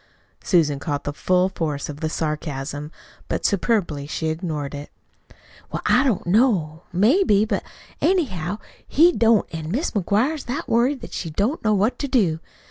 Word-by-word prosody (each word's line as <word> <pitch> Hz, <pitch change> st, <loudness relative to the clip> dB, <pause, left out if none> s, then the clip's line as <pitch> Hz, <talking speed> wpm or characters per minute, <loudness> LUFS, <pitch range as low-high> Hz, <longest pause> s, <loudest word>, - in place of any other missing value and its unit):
Susan 155 Hz, -7 st, +2 dB
caught 145 Hz, -1 st, -3 dB
the 145 Hz, -, -3 dB
full 180 Hz, +4 st, +2 dB
force 150 Hz, -6 st, -3 dB
of 145 Hz, -1 st, -7 dB
the 160 Hz, -1 st, -1 dB
sarcasm, 150 Hz, -2 st, -3 dB, 0.4 s
but -, -, -2 dB
superbly 185 Hz, -9 st, 0 dB
she 160 Hz, +1 st, -2 dB
ignored 155 Hz, -4 st, -3 dB
it. 145 Hz, 0 st, -7 dB, 0.8 s
"Well, -, -, -4 dB
I 250 Hz, -, +4 dB
don't 250 Hz, -9 st, 0 dB
know 175 Hz, -6 st, +2 dB
maybe; 215 Hz, -, +4 dB
but, 220 Hz, -, -1 dB, 0.4 s
anyhow, 205 Hz, -, 0 dB, 0.3 s
he 335 Hz, +4 st, +5 dB
don't, 230 Hz, -, +3 dB
an' 160 Hz, -1 st, -5 dB
Mis' 260 Hz, -, -1 dB
McGuire's 225 Hz, -, 0 dB
that 280 Hz, +7 st, -4 dB
worried 240 Hz, +1 st, +1 dB
she 165 Hz, -, -4 dB
don't 205 Hz, -, -1 dB
know 215 Hz, -1 st, +3 dB
what 210 Hz, +5 st, +1 dB
to 285 Hz, -, -2 dB
do. 190 Hz, -, +2 dB
185 Hz, 155 wpm, -22 LUFS, 155-235 Hz, 0.8 s, he